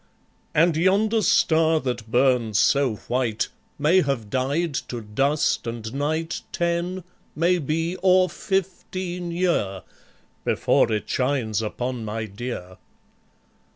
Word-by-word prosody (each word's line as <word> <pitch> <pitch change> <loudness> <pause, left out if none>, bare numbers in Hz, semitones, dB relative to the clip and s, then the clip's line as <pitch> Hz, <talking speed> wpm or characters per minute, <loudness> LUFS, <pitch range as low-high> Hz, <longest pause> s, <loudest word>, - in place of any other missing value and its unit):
And 165 +1 +4
yonder 205 +6 +3
star 160 -4 +3
that 120 -4 -4
burns 120 -3 +2
so 140 -3 +3
white, 120 -3 0 0.3
May 160 +6 +4
have 125 - -2
died 145 +5 0 0.2
to 120 -2 -4
dust 135 +7 0
and 115 -1 -5
night 155 +4 -2
Ten, 175 +1 -1 0.3
maybe, 165 0 +1
or 185 0 +4
fifteen 180 -1 -3
year, 170 - 0 0.6
Before 115 - +2
it 105 -1 -1
shines 125 -5 0
upon 120 +2 -3
my 110 +1 -3
dear. 100 -4 -7
140 Hz, 110 wpm, -24 LUFS, 115-175 Hz, 0.6 s, And